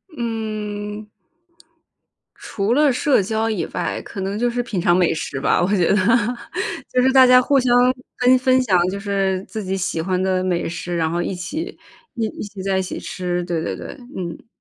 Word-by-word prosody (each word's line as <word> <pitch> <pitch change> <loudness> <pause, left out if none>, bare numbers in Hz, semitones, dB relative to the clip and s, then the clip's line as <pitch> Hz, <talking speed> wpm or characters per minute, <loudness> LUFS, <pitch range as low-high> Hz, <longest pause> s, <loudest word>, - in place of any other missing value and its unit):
嗯。 215 -3 -4 1.3
除 205 +3 -2
了 295 +1 +4
社 270 -1 +3
交 220 +3 -1
以 215 - -1
外， - - -2
可 195 - -7
能 195 +2 -2
就 240 +1 +1
是 245 +1 -1
品 210 -5 -3
尝 175 0 +3
美 180 -2 +3
食 155 -4 -4
吧， - - +2
我 175 - +2
觉 175 -4 +2
得。 - - +4 0.9
就 250 - +2
是 260 +1 +4
大 260 -1 +7
家 250 0 +7
互 275 +2 +3
相 245 -1 +2 0.4
跟 250 +1 +5
分 255 0 +3
享 190 -7 +3
就 200 +1 -4
是 195 -2 -1
自 220 -2 -6
己 190 0 -2
喜 180 -3 -2
欢 185 +2 -1
的 185 -1 +1
美 180 -3 -1
食， 175 +1 -4
然 160 -1 +1
后 175 - -1
一 190 - -2
起 270 - -5 0.4
一 230 -3 -1
一 - - -7
起 205 -2 -8
在 195 0 0
一 - - +2
起 185 - -5
吃。 180 -1 -3
对， 170 -2 -2
对， - - -3
对， - - -8 0.3
嗯。 170 +1 -6
200 Hz, 215 characters per minute, -21 LUFS, 185-240 Hz, 1.3 s, 大